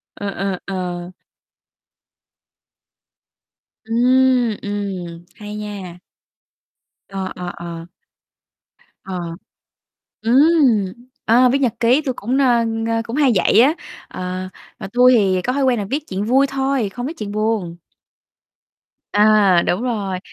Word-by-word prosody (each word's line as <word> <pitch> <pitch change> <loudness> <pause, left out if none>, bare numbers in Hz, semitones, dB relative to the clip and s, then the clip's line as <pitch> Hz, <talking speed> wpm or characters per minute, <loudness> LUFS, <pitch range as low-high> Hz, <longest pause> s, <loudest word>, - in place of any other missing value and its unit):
Ờ, 205 - -4
ờ, 195 -1 -3
ờ. 180 -2 -4 2.7
Ừm, 245 0 +3
ừm, 190 -5 -5
hay 210 -2 -8
nha. 200 -4 -7 1.1
Ờ, 195 -1 -5
ờ, 180 -1 -5
ờ. 170 -1 -7 1.2
Ờ. 185 -2 -5 1.0
Ừm, 260 -2 +4 0.4
ờ, 245 +3 +5
viết 275 - +2
nhật 255 -6 0
ký, 240 +5 +4
tui 270 -4 -2
cũng, 240 +4 -2
nơ, 245 -4 +3 0.3
ơ, 225 0 0
cũng 230 +3 -5
hay 285 -4 +3
vậy 210 - +4
á, 275 +6 +5 0.3
ờ, 185 0 -5 0.3
mà - - -7
tui 250 +1 +6
thì 190 -4 +2
có 250 - -1
thói 275 +1 0
quen 255 -2 +2
là 205 - -2
viết 290 +2 -2
chuyện 195 +2 -3
vui 265 +5 +3
thôi, 270 -4 -1
không 245 +5 -6
viết 320 +4 -7
chuyện 205 -2 -5
buồn. 210 -5 -1 1.4
À, 205 -4 +5
đúng 180 - 0
rồi. 205 -7 -2
215 Hz, 125 wpm, -19 LUFS, 190-255 Hz, 2.7 s, tui